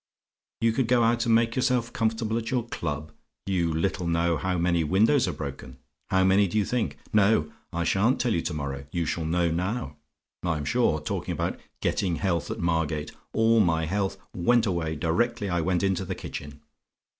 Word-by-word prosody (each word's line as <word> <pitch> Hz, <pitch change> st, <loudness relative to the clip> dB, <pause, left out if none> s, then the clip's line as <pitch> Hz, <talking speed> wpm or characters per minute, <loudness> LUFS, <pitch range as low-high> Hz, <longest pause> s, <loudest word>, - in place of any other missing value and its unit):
"You 115 Hz, 0 st, +4 dB
could 125 Hz, +1 st, 0 dB
go 120 Hz, -1 st, +4 dB
out 120 Hz, +1 st, +2 dB
and 115 Hz, -, +5 dB
make 115 Hz, 0 st, +2 dB
yourself 125 Hz, -2 st, +1 dB
comfortable 110 Hz, 0 st, 0 dB
at 115 Hz, -, -5 dB
your 125 Hz, -3 st, 0 dB
club. 75 Hz, -4 st, -4 dB, 0.3 s
You 90 Hz, -4 st, 0 dB
little 85 Hz, +2 st, -1 dB
know 85 Hz, 0 st, +2 dB
how 90 Hz, +3 st, -1 dB
many 85 Hz, -1 st, +2 dB
windows 105 Hz, -, +3 dB
are -, -, 0 dB
broken. 70 Hz, -4 st, -7 dB, 0.3 s
How 95 Hz, 0 st, +3 dB
many 95 Hz, +2 st, +4 dB
do 90 Hz, -, -2 dB
you 105 Hz, -, +2 dB
think? 125 Hz, +1 st, -1 dB, 0.2 s
No: 100 Hz, -7 st, +3 dB, 0.2 s
I 85 Hz, 0 st, -1 dB
sha'n't 100 Hz, +9 st, +2 dB
tell 120 Hz, -3 st, +1 dB
you 85 Hz, -, +1 dB
to 85 Hz, -, -3 dB
morrow 70 Hz, -2 st, -4 dB
you 85 Hz, -1 st, -1 dB
shall 80 Hz, +1 st, -2 dB
know 85 Hz, +1 st, +1 dB
now. 90 Hz, -, -2 dB, 0.4 s
I'm 80 Hz, -4 st, -1 dB
sure! 70 Hz, -, +2 dB
Talking -, -, -3 dB
about -, -, -2 dB, 0.2 s
getting 90 Hz, -4 st, 0 dB
health 85 Hz, -3 st, -1 dB
at -, -, -3 dB
Margate; 80 Hz, -3 st, -1 dB, 0.2 s
all 115 Hz, 0 st, +4 dB
my 80 Hz, -5 st, +2 dB
health 95 Hz, +3 st, -1 dB, 0.2 s
went 115 Hz, +6 st, +3 dB
away 85 Hz, -5 st, -1 dB
directly 100 Hz, +7 st, 0 dB
I 85 Hz, -2 st, +1 dB
went 90 Hz, +2 st, 0 dB
into 95 Hz, -1 st, +1 dB
the 95 Hz, -, -4 dB
kitchen. 75 Hz, 0 st, -8 dB
90 Hz, 190 wpm, -26 LUFS, 80-110 Hz, 0.4 s, and